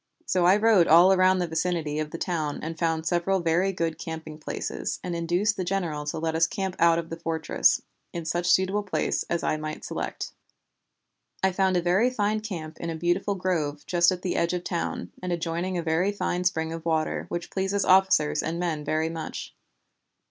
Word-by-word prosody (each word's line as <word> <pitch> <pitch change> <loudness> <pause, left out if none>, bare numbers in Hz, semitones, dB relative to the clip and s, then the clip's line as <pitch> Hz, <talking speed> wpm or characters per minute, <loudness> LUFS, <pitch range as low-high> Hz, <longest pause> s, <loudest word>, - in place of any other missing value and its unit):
So 180 - +2
I 190 +3 +6
rode 210 -5 +5
all 175 +4 +7
round 185 0 +4
the 180 - +1
vicinity 160 -2 -1
of 155 -1 -2
the 165 - -6
town 155 -5 -2
and 160 0 -5
found 165 -1 0
several 175 +3 +1
very 175 +3 +2
good 165 -3 -2
camping 160 -2 -7
places, 155 - -4
and 180 -1 -3
induced 175 +5 0
the 185 - -1
general 175 -5 -2
to 150 - -3
let 160 0 -1
us 160 0 +3
camp 190 -2 -3
out 165 0 +5
of 165 -1 -4
the 165 - -5
fortress, 160 -1 +1 0.3
in 170 -1 -5
such 175 +2 -1
suitable 190 +3 +3
place 200 -2 -1
as 170 - -1
I 155 - +1
might 155 0 -6
select. - - -4 1.1
I 190 - +4
found 190 0 +2
a 175 - 0
very 190 +8 +3
fine 215 -3 0
camp 175 -8 -7
in 170 - -4
a 165 - -3
beautiful 175 +5 0
grove 160 -6 -2
just 175 0 +3
at 180 -1 -4
the 180 - -1
edge 170 +1 +1
of 180 - -1
the - - -7
town, 170 - -3
and 180 0 -3
adjoining 175 +2 -2
a 170 - -2
very 165 +5 +1
fine 180 -3 -2
spring 160 -3 0
of 165 -1 -6
water, 160 -1 0
which 175 0 -4
pleases 195 +1 0
officers 185 -6 +4
and 165 +1 -3
men 165 -4 -2
very 155 +2 0
much. 165 -1 -6
170 Hz, 205 wpm, -26 LUFS, 160-185 Hz, 1.1 s, all